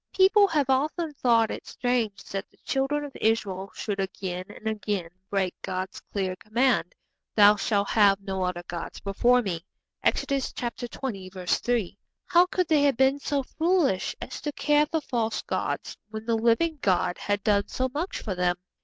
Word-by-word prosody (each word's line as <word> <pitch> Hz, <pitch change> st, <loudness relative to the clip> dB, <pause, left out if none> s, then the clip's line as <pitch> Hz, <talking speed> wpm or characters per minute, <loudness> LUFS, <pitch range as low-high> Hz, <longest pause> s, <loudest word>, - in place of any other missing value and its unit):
People 400 Hz, +2 st, +6 dB
have 300 Hz, -7 st, +1 dB
often 300 Hz, +4 st, 0 dB
thought 230 Hz, -5 st, +3 dB
it -, -, -7 dB
strange 240 Hz, -5 st, -1 dB
that 195 Hz, +1 st, -4 dB
the -, -, -28 dB
Children 275 Hz, +2 st, 0 dB
of 280 Hz, -, -10 dB
Israel 200 Hz, -4 st, 0 dB
should 205 Hz, -2 st, -3 dB
again 185 Hz, -1 st, -3 dB
and 220 Hz, -, -8 dB
again 205 Hz, -5 st, -2 dB, 0.2 s
break 190 Hz, -3 st, 0 dB
God's 185 Hz, +1 st, -4 dB
clear 190 Hz, -2 st, -1 dB
command, 215 Hz, -5 st, +1 dB, 0.4 s
'Thou 210 Hz, 0 st, +8 dB
shall 200 Hz, 0 st, +1 dB
have 200 Hz, -2 st, +4 dB
no 195 Hz, -1 st, -4 dB
other 180 Hz, -1 st, -2 dB
gods 170 Hz, -1 st, -6 dB
before 240 Hz, +5 st, +3 dB
Me.' 170 Hz, -5 st, -3 dB, 0.4 s
(Exodus 275 Hz, -1 st, 0 dB
xx. 200 Hz, -7 st, -3 dB
3.) 230 Hz, -6 st, -1 dB, 0.3 s
How 350 Hz, 0 st, +5 dB
could 365 Hz, -1 st, 0 dB
they 310 Hz, -3 st, +4 dB
have 280 Hz, -4 st, +3 dB
been 265 Hz, +1 st, +3 dB
so 280 Hz, -1 st, -1 dB
foolish 320 Hz, -, +1 dB
as 250 Hz, -, -7 dB
to 295 Hz, -, -2 dB
care 295 Hz, +1 st, +3 dB
for 320 Hz, +1 st, -1 dB
false 230 Hz, -5 st, -1 dB
gods -, -, -3 dB
when 220 Hz, 0 st, -7 dB
the 230 Hz, -, +1 dB
living 235 Hz, +8 st, +2 dB
God 180 Hz, -2 st, +1 dB
had 205 Hz, -1 st, -1 dB
done 200 Hz, -1 st, +2 dB
so 260 Hz, -, -1 dB
much 330 Hz, +6 st, -3 dB
for 205 Hz, -, -2 dB
them? 180 Hz, -1 st, +1 dB
225 Hz, 170 wpm, -26 LUFS, 195-275 Hz, 0.4 s, Thou